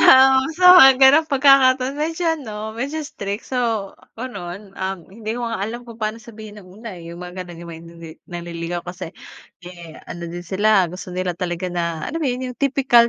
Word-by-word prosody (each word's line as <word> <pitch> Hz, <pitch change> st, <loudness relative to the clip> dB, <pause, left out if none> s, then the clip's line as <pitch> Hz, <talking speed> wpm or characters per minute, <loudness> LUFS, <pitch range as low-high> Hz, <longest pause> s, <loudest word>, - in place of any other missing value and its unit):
Oo, 265 Hz, 0 st, +7 dB, 0.2 s
sa 365 Hz, -, 0 dB
mga 270 Hz, -6 st, +10 dB
ganong 285 Hz, +4 st, +6 dB
pagkakataon 270 Hz, -1 st, +4 dB
medyo 325 Hz, +3 st, -2 dB
ano, 220 Hz, -8 st, -5 dB
medyo 280 Hz, +6 st, -3 dB
strict. 200 Hz, -6 st, -6 dB
So, 230 Hz, -6 st, -1 dB, 0.2 s
gano'n. 200 Hz, -5 st, -7 dB
Um, 190 Hz, 0 st, -3 dB
hindi 220 Hz, +1 st, -5 dB
ko 240 Hz, -, -3 dB
nga 230 Hz, -4 st, -4 dB
alam 230 Hz, +4 st, -4 dB
kung 230 Hz, -1 st, -12 dB
paano 215 Hz, +1 st, -2 dB
sabihin 215 Hz, -2 st, -11 dB
nung 185 Hz, +3 st, -16 dB
una, 225 Hz, -6 st, -8 dB
eh, 170 Hz, 0 st, -10 dB
yung 170 Hz, -, -10 dB
mga 180 Hz, +1 st, -7 dB
gano'n 170 Hz, -1 st, -11 dB
yung 170 Hz, 0 st, -9 dB
may 165 Hz, 0 st, -9 dB
nini 165 Hz, -1 st, -11 dB, 0.2 s
nanliligaw 170 Hz, 0 st, -5 dB
kasi, 175 Hz, -2 st, -7 dB, 0.5 s
eh 170 Hz, -3 st, -11 dB
ano 170 Hz, 0 st, -7 dB
din 175 Hz, +1 st, -7 dB
sila 195 Hz, 0 st, +2 dB
gusto 180 Hz, +1 st, -9 dB
nila 180 Hz, 0 st, -2 dB
talaga 180 Hz, 0 st, -3 dB
na 170 Hz, -2 st, -3 dB
alam 330 Hz, +2 st, -4 dB
mo 300 Hz, -, 0 dB
'yon, 250 Hz, 0 st, -3 dB
yung -, -, -21 dB
tipikal 260 Hz, -4 st, +4 dB
210 Hz, 195 wpm, -21 LUFS, 175-255 Hz, 0.5 s, mga